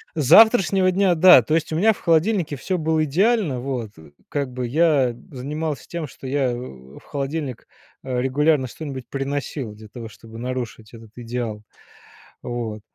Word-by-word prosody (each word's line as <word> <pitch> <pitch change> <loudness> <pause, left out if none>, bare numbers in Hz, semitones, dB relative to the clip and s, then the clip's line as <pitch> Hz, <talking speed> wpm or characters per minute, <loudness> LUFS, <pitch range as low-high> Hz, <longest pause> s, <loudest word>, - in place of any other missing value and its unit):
С 155 - 0
завтрашнего 195 - +6
дня, 190 -1 +3
да, 170 -5 +8
то 155 - -2
есть 160 -1 0
у - - -1
меня 215 +7 +4
в - - -15
холодильнике 165 -1 +1
всё 185 +7 -2
было 160 0 +1
идеально, 185 - +1
вот. 125 -4 -4
Э, 80 -2 -15 0.2
как 140 -3 -3
бы 125 0 -4
я 145 -3 +2 0.2
занимался 150 +3 -4
тем, 170 -3 -5
что 135 - -14
я 135 -1 0
в 65 - -10
в - - -24
холодильник, 140 -2 -4 0.4
э, 130 -2 -2
регулярно 145 +2 +2
что-нибудь 130 -2 -7
приносил 140 -3 -4
для 110 +1 -13
того, 115 +1 -9
чтобы 115 +1 -13
нарушить 120 -3 -5
этот 115 -2 -14
идеал, 120 -3 -5 0.8
вот. 115 -3 -4
135 Hz, 165 wpm, -22 LUFS, 120-160 Hz, 0.8 s, да